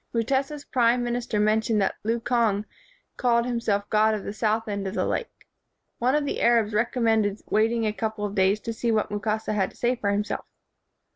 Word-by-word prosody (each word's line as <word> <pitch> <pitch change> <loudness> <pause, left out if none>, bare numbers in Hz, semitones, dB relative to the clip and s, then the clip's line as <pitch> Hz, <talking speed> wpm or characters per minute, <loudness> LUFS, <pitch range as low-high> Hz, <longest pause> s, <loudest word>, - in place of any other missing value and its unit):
Mutesa 270 +5 0
's 285 - -13
prime 245 -1 +2
minister 240 -2 -2
mentioned 215 +1 +2
that 195 - +1
Lukonge 230 -2 +1 0.5
called 235 -2 +2
himself 225 -5 -1
god 215 0 +4
of 210 - -5
the 200 - -5
south 220 +1 0
end 200 -2 -3
of 190 - -5
the - - 0
lake. 470 - -4 0.5
One 255 +4 +2
of 300 -1 +1
the - - -3
Arabs 230 -3 +3
recommended 220 -2 +1
waiting 225 +2 +2
a 210 - 0
couple 215 -1 -3
of 205 - -4
days 195 +1 +2
to 230 - -4
see 230 +1 -1
what 215 -2 0
Mukasa 215 +1 -2
had 195 -2 +1
to - - -20
say 245 +1 +1
for 205 -4 -2
himself. 205 +1 -1
220 Hz, 195 wpm, -25 LUFS, 210-235 Hz, 0.5 s, god